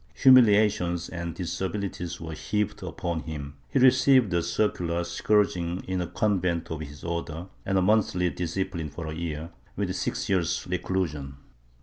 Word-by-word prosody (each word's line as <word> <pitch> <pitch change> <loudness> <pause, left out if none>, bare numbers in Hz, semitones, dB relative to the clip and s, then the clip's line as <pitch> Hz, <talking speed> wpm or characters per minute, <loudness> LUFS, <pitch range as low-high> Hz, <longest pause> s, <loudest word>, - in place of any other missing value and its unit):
Humiliations 105 -8 +5
and 85 -2 -5
disabilities 90 0 -3
were 80 -1 -6
heaped 105 +6 -2
upon 85 -2 -3
him; 75 -3 -7
he - - 0
received 130 -4 +5
a 85 - +2
circular 85 -1 0
scourging 90 -1 +1
in 95 -1 -1
a 90 - -2
convent 90 -5 0
of 80 - -3
his 75 -1 -9
order 85 0 -4 0.2
and 95 0 +2
a 95 - +3
monthly 90 -3 +2
discipline 90 -2 -3
for 80 +4 -7
a 80 - -4
year, 80 0 -4 0.2
with - - -2
six - - -2
years 90 -4 0
of - - -9
reclusion.' 75 -8 -2
85 Hz, 150 wpm, -27 LUFS, 80-95 Hz, 0.2 s, Humiliations